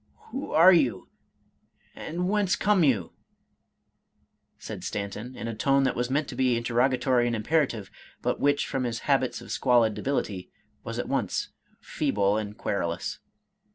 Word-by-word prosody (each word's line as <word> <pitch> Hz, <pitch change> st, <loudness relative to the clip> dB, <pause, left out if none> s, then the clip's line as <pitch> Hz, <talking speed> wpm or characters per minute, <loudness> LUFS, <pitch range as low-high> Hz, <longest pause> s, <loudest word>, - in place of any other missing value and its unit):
" -, -, -37 dB, 0.2 s
Who 270 Hz, -, -5 dB
are 175 Hz, +4 st, +7 dB
you, 125 Hz, -, +1 dB, 0.9 s
and 175 Hz, +3 st, -3 dB
whence 200 Hz, -2 st, +2 dB
come 205 Hz, -4 st, +3 dB
you? 110 Hz, -, +1 dB, 0.7 s
" -, -, -52 dB, 0.7 s
said -, -, -8 dB
Stanton, 105 Hz, +5 st, -5 dB
in 115 Hz, -, -5 dB
a 115 Hz, -, -3 dB
tone 135 Hz, +5 st, +2 dB
that 135 Hz, -, +1 dB
was 125 Hz, +1 st, -1 dB
meant 145 Hz, +2 st, 0 dB
to -, -, -6 dB
be 125 Hz, -2 st, +2 dB
interrogatory 125 Hz, +1 st, +2 dB
and 120 Hz, -, 0 dB
imperative, 115 Hz, -3 st, 0 dB, 0.3 s
but -, -, 0 dB
which, 145 Hz, 0 st, +2 dB
from 135 Hz, -2 st, -2 dB
his 115 Hz, -1 st, -3 dB
habits 135 Hz, -3 st, +1 dB
of -, -, -10 dB
squalid 120 Hz, -4 st, +3 dB
debility, 105 Hz, -8 st, -3 dB, 0.3 s
was -, -, -5 dB
at -, -, -3 dB
once -, -, -1 dB, 0.3 s
feeble 100 Hz, 0 st, 0 dB
and 105 Hz, -1 st, -4 dB
querulous. 85 Hz, -5 st, -3 dB
125 Hz, 155 wpm, -27 LUFS, 110-145 Hz, 0.9 s, are